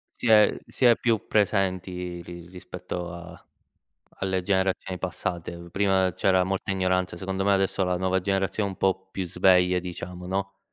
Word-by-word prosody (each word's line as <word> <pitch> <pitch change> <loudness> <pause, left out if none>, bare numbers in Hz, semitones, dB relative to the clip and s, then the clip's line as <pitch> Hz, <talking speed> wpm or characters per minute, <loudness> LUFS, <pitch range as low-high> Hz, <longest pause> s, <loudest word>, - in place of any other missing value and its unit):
Si 125 - -4
è 105 -2 +6
si 130 - -1
è 120 -1 +7
più 115 -3 0
presenti 90 -3 0
ri 85 0 -10
rispetto 90 -1 -7
a 85 -1 -11 0.8
alle 95 -1 0
generazioni 95 -1 0
passate. 90 -2 -4
Mhmm, 85 0 -11
prima 95 0 +2
c'era 95 -1 +3
molta 95 +1 -2
ignoranza, 95 -1 0
secondo 95 +1 -3
me 100 - +3
adesso 95 0 +1
la 90 0 0
nuova 95 +1 +1
generazione 95 +2 0
è - - -5
un - - -11
po' 95 0 0
più 95 -1 -3
sveglia 90 0 +4
diciamo, 90 0 -7
no, 100 +1 -3
95 Hz, 170 wpm, -26 LUFS, 90-95 Hz, 0.8 s, è